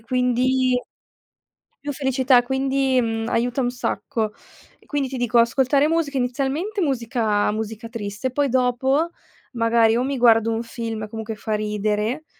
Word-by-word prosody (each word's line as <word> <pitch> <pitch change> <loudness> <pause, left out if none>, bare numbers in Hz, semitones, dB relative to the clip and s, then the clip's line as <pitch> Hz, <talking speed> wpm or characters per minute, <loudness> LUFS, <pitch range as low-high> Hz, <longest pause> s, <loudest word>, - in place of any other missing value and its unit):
quindi 250 +1 +1 1.0
più 290 0 -4
felicità, 260 -2 +3
quindi 265 0 +1
mhmm, 225 -1 -2
aiuta 245 +3 0
un 245 -1 0
sacco. 225 -3 -2 0.5
E - - -25
quindi 280 -3 -2
ti 265 - -5
dico 240 -1 +2
ascoltare 265 +5 +3
musica, 315 -4 0
inizialmente 275 - -1
musica 230 -7 0
musica 220 +1 -5
triste, 215 +2 -4
poi 285 +1 +1
dopo 260 +5 +1 0.4
magari 230 -1 +3
o 245 - +1
mi 275 0 -2
guardo 230 -2 +4
un 225 +1 -2
film 225 -3 -5
comunque 220 0 -6
fa 215 +1 -4
ridere 210 +6 -1
245 Hz, 140 wpm, -22 LUFS, 225-265 Hz, 1.0 s, guardo